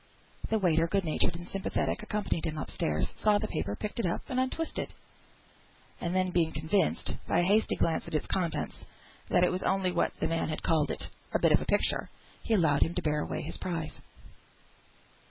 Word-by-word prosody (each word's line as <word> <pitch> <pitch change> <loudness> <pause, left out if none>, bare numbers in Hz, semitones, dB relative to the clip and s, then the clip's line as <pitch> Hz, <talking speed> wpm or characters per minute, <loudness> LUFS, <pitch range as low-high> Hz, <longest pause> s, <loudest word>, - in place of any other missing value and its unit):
The 220 - +3
waiter, 165 -4 +3
good 195 +1 0
natured 165 +2 +1
and 175 +1 -7
sympathetic, 195 +4 -1
accompanied 210 -6 -1
him 155 -1 -3
up 145 - -4
stairs; 75 0 0
saw 210 -1 +5
the 215 +1 -2
paper 100 - -2
picked 210 - -5
up 180 -7 0
and 255 -2 0
untwisted, 260 +5 -2 1.0
and 175 +1 -2
then 185 -1 +2
being 170 -2 +2
convinced, 160 +6 0
by - - +3
a - - +2
hasty 205 +4 +3
glance 165 0 0
at 170 - -4
its 155 - 0
contents, 170 -4 -2 0.5
that 175 - +4
it 180 - +4
was 185 - -2
only 190 -1 +1
what - - +1
the - - +1
man 165 0 0
had 155 - -3
called 155 -3 +2
it, - - -3 0.3
"a - - +4
bit - - +4
of - - +5
a - - -3
picture," - - +2 0.3
he 225 - +1
allowed 160 -7 +3
him 165 - +2
to 180 - 0
bear 150 -1 +1
away - - -3
his 160 - -5
prize. 165 -4 -4
175 Hz, 200 wpm, -30 LUFS, 160-200 Hz, 1.0 s, saw